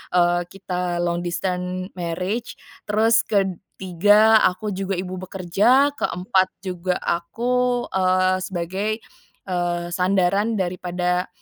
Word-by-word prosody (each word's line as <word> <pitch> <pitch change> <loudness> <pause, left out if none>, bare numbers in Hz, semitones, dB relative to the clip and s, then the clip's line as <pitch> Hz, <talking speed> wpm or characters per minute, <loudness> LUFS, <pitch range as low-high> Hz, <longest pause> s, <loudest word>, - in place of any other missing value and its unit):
eee, 175 0 +3
kita 180 -2 -3
long 175 0 0
distance 180 +1 -3
marriage, 180 +6 -3 0.3
terus 220 +2 +3
ketiga 200 +2 +3
aku 210 +3 -5
juga 195 0 -2
ibu 185 +1 -4
bekerja, 200 +10 +2
keempat 185 -2 +1 0.2
juga 180 -1 -2
aku, 245 +8 0
eee, 185 0 +2
sebagai, 190 +2 -3 0.6
eee, 175 -1 -1
sandaran 190 +4 +1
daripada 180 -1 -1
185 Hz, 100 wpm, -22 LUFS, 180-205 Hz, 0.6 s, eee